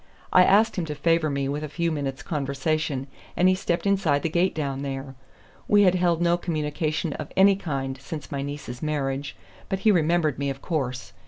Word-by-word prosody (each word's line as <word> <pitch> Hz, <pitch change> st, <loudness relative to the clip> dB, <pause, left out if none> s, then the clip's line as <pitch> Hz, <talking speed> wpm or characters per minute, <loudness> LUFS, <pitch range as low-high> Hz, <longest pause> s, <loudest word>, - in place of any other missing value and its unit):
I 185 Hz, -, +8 dB
asked 210 Hz, +4 st, +4 dB
him 175 Hz, -, -1 dB
to 150 Hz, -1 st, -5 dB
favor 165 Hz, +1 st, +2 dB
me 140 Hz, -1 st, -1 dB
with 145 Hz, +2 st, -3 dB
a 155 Hz, -, -4 dB
few 170 Hz, +2 st, -1 dB
minutes' 140 Hz, -3 st, -3 dB
conversation, 145 Hz, -1 st, -1 dB, 0.3 s
and 180 Hz, -, +4 dB
he 185 Hz, -, +5 dB
stepped 185 Hz, -1 st, -1 dB
inside 190 Hz, -8 st, +2 dB
the 165 Hz, -, 0 dB
gate 175 Hz, +4 st, +1 dB
down 140 Hz, -3 st, -2 dB
there. 135 Hz, -1 st, -5 dB, 0.5 s
We 205 Hz, 0 st, +5 dB
had 180 Hz, -2 st, +5 dB
held 175 Hz, -2 st, +2 dB
no 170 Hz, 0 st, +3 dB
communication 155 Hz, -1 st, -2 dB
of 155 Hz, -, -7 dB
any 195 Hz, +1 st, +6 dB
kind 135 Hz, -7 st, -4 dB
since 150 Hz, 0 st, -7 dB
my 140 Hz, -1 st, -2 dB
niece's 140 Hz, -3 st, -6 dB
marriage, 140 Hz, -2 st, -2 dB, 0.3 s
but 195 Hz, 0 st, -2 dB
he 215 Hz, -, +5 dB
remembered 165 Hz, -5 st, +2 dB
me, 140 Hz, 0 st, -1 dB
of 135 Hz, 0 st, -5 dB
course. 130 Hz, -6 st, -3 dB
155 Hz, 195 wpm, -25 LUFS, 140-175 Hz, 0.5 s, I